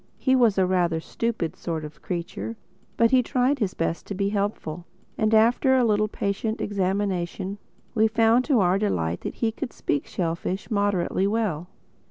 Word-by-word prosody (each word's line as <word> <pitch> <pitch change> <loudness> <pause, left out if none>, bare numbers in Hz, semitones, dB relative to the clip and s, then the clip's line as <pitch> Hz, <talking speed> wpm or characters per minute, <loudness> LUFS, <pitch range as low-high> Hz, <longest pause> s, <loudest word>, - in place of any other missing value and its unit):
He 260 -1 +2
was 235 -6 +4
a 190 - +4
rather 175 -3 +1
stupid 220 -1 -3
sort 160 -3 -4
of 150 0 -11
creature; 180 +6 -4 0.4
but 230 0 +4
he 260 -1 +6
tried 255 +3 +1
his 200 -5 -1
best 165 0 -2
to 200 - -4
be 200 +1 0
helpful. 200 -5 -3 0.3
And 215 0 +1
after 235 +4 +4
a 255 - +4
little 215 -2 +2
patient 210 +2 -2
examination 195 -1 -2 0.3
we 220 -2 +4
found 225 +2 +3
to 265 -8 +3
our 185 +1 +3
delight 85 - -1
that - - -5
he 225 -1 0
could 235 +1 -5
speak 145 - -2
shellfish 180 +5 -3
moderately 200 -2 +1
well. 200 -7 -1
200 Hz, 170 wpm, -25 LUFS, 180-225 Hz, 0.4 s, he